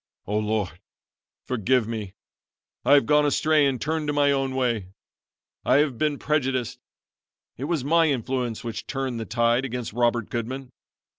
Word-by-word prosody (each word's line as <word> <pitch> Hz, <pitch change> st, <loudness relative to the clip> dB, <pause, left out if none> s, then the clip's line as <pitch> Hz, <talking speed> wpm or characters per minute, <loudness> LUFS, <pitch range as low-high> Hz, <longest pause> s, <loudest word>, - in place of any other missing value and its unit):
"Oh, 105 Hz, +2 st, 0 dB
Lord, 105 Hz, -5 st, -2 dB, 0.7 s
forgive 125 Hz, 0 st, +1 dB
me. 105 Hz, -4 st, -5 dB, 0.7 s
I 140 Hz, -, +5 dB
have 145 Hz, -, +6 dB
gone 150 Hz, 0 st, +4 dB
astray 150 Hz, 0 st, +3 dB
and 130 Hz, -3 st, -1 dB
turned 155 Hz, +2 st, -2 dB
to 145 Hz, -, 0 dB
my 145 Hz, -1 st, +3 dB
own 135 Hz, -1 st, 0 dB
way. 120 Hz, -7 st, 0 dB, 0.8 s
I -, -, +3 dB
have 140 Hz, -5 st, +2 dB
been 150 Hz, -2 st, +1 dB
prejudiced. 135 Hz, -5 st, -1 dB, 0.8 s
It 130 Hz, -, -5 dB
was 160 Hz, -4 st, -1 dB
my 165 Hz, +3 st, +4 dB
influence 125 Hz, -3 st, -2 dB
which 115 Hz, -3 st, -5 dB
turned 135 Hz, -4 st, -3 dB
the 115 Hz, -, -4 dB
tide 120 Hz, +2 st, +2 dB
against 125 Hz, -4 st, -4 dB
Robert 120 Hz, -1 st, +1 dB
Goodman. 125 Hz, +3 st, -4 dB
130 Hz, 155 wpm, -25 LUFS, 115-145 Hz, 0.8 s, have